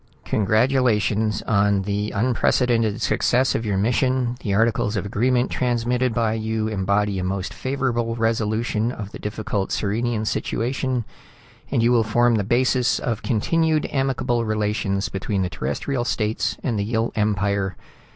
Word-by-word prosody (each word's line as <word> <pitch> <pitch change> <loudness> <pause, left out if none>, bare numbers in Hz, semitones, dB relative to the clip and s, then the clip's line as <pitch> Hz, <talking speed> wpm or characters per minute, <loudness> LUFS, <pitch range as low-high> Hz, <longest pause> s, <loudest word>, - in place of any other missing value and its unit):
"Congratulations 110 -1 +1
on 100 -2 +2
the 105 +1 -2
unprecedented 115 -1 +1
success 130 +2 +2
of 115 - -2
your 100 -2 0
mission. 125 +3 +1
The 105 - -3
articles 110 -1 +1
of 100 - -2
agreement 125 +5 +1
transmitted 125 0 0
by 115 -1 0
you 110 0 -2
embody 100 -1 0
a - - -2
most 95 0 -3
favorable 125 -4 -1
resolution 115 0 0
of 105 -5 -7
the - - -9
difficult 105 -2 -3
Sirenian 110 +2 -1
situation, 125 +2 -1 0.6
and 115 0 +2
will 120 -1 +4
form 120 +2 +3
the 105 -3 +1
basis 125 +3 +2
of 115 -2 -2
continued 155 +7 +1
amicable 130 -3 0
relations 105 -2 -1
between 95 0 -2
the 90 - -3
Terrestrial 120 - -2
States 110 -2 -1
and 115 -5 -1
the - - 0
Yill 115 +2 -1
Empire. 100 -3 0
110 Hz, 140 wpm, -22 LUFS, 105-120 Hz, 0.6 s, will